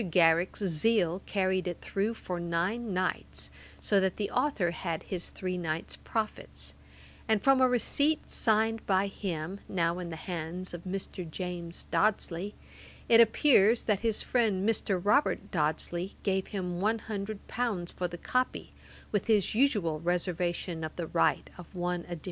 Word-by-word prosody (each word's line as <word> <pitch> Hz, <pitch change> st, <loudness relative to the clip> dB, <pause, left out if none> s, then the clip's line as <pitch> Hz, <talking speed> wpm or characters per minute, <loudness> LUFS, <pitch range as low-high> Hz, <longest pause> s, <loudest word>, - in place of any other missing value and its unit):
Garrick's 170 Hz, +3 st, +3 dB
zeal 185 Hz, 0 st, +2 dB
carried 190 Hz, -2 st, +1 dB
it 175 Hz, -, -3 dB
through 210 Hz, +4 st, -1 dB
for 180 Hz, -5 st, -5 dB
nine 180 Hz, +7 st, -1 dB
nights, 185 Hz, 0 st, -2 dB, 0.3 s
so 200 Hz, -, +3 dB
that 190 Hz, -1 st, 0 dB
the 205 Hz, -, -2 dB
authour 200 Hz, -13 st, +1 dB
had 165 Hz, -1 st, -3 dB
his 180 Hz, -2 st, -4 dB
three 185 Hz, -1 st, -3 dB
nights' 160 Hz, -1 st, -3 dB
profits; 220 Hz, -2 st, -3 dB, 0.5 s
and 220 Hz, -2 st, +2 dB
from 270 Hz, -1 st, +5 dB
a 255 Hz, -, +6 dB
receipt 285 Hz, +5 st, +1 dB
signed 225 Hz, 0 st, +2 dB
by 190 Hz, 0 st, +3 dB
him, 190 Hz, -2 st, -4 dB
now 170 Hz, -1 st, +1 dB
in 175 Hz, -1 st, -5 dB
the 165 Hz, -, -5 dB
hands 175 Hz, +2 st, -5 dB
of 175 Hz, +1 st, -7 dB
Mr. 185 Hz, -2 st, -4 dB
James 175 Hz, 0 st, -5 dB
Dodsley, 200 Hz, -2 st, +1 dB, 0.5 s
it 230 Hz, 0 st, +8 dB
appears 230 Hz, -1 st, +5 dB
that 210 Hz, -3 st, +1 dB
his 225 Hz, -2 st, 0 dB
friend 215 Hz, -5 st, +1 dB
Mr. 205 Hz, -4 st, +1 dB
Robert 210 Hz, -, +2 dB
Dodsley 170 Hz, +3 st, -1 dB
gave 190 Hz, -1 st, 0 dB
him 180 Hz, -3 st, -3 dB
one 220 Hz, +3 st, +2 dB
hundred 210 Hz, -1 st, -5 dB
pounds 210 Hz, -8 st, -2 dB
for 180 Hz, -, -2 dB
the 175 Hz, 0 st, -7 dB
copy, 255 Hz, +7 st, -1 dB, 0.4 s
with 205 Hz, 0 st, 0 dB
his 215 Hz, -4 st, +3 dB
usual 210 Hz, -, +2 dB
reservation 175 Hz, 0 st, -1 dB
of 155 Hz, -, -5 dB
the 170 Hz, -, -3 dB
right -, -, +2 dB
of 180 Hz, +1 st, -12 dB
one 175 Hz, -1 st, -2 dB
edition. 175 Hz, -2 st, -6 dB
185 Hz, 155 wpm, -30 LUFS, 175-215 Hz, 0.5 s, it